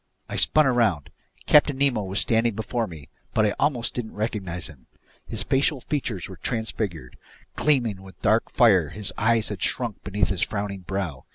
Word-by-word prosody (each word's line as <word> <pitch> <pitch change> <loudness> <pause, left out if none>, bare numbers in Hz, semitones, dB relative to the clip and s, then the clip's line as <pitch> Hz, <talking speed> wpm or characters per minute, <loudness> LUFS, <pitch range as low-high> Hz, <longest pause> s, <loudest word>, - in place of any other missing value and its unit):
I - - -6
spun 155 -1 +4
around. 115 - +1 0.3
Captain 145 -2 +5
Nemo 135 -5 +2
was 95 0 -2
standing 115 -1 +1
before 110 +1 -2
me, 80 -7 -11 0.3
but 110 - +4
I 105 - +1
almost 135 -5 +1
didn't 115 -3 -5
recognize 100 -5 -3
him. 70 -6 -11 0.4
His - - -2
facial 135 +1 +1
features 120 - -3
were 95 - -10
transfigured. 100 - -3 0.4
Gleaming 120 -10 +1
with 95 -1 -14
dark 110 +1 +3
fire, 95 -10 +4
his 100 +3 -2
eyes 115 0 +2
had 100 -3 -6
shrunk 120 -5 0
beneath 100 -1 0
his 95 -3 -2
frowning 100 -2 -2
brow. 90 -7 -4
105 Hz, 170 wpm, -25 LUFS, 95-120 Hz, 0.4 s, Captain